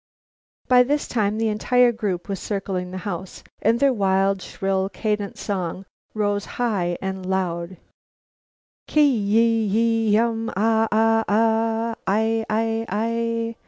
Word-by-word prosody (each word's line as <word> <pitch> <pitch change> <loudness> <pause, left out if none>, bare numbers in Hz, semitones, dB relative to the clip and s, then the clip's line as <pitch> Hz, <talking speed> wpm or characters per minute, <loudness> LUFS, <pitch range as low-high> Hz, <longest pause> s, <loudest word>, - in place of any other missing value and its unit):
By 250 -1 +6
this 285 +4 0
time 215 -2 0
the 225 0 +1
entire 245 +3 +3
group 200 -6 -3
were 200 - -2
circling 190 -2 -4
the 185 - -6
house, 190 -1 -6 0.2
and 230 +3 +2
their 275 -1 +4
wild 195 -2 +1
shrill 195 0 -2
cadent 210 -1 -3
song 190 -2 -4 0.3
rose 205 -1 0
high 195 -8 0
and 190 0 -4
loud: 185 -1 -2 1.1
"Ki 300 -1 +4
yi 225 -3 +2 0.2
yi 225 0 +2
um 225 0 0
Ah! 225 +1 +2
Ah! 225 +1 +3
Ah! 225 +1 +1
I 220 +3 +1
I 225 +1 0
I!" 230 +2 -1
215 Hz, 130 wpm, -23 LUFS, 195-225 Hz, 1.1 s, By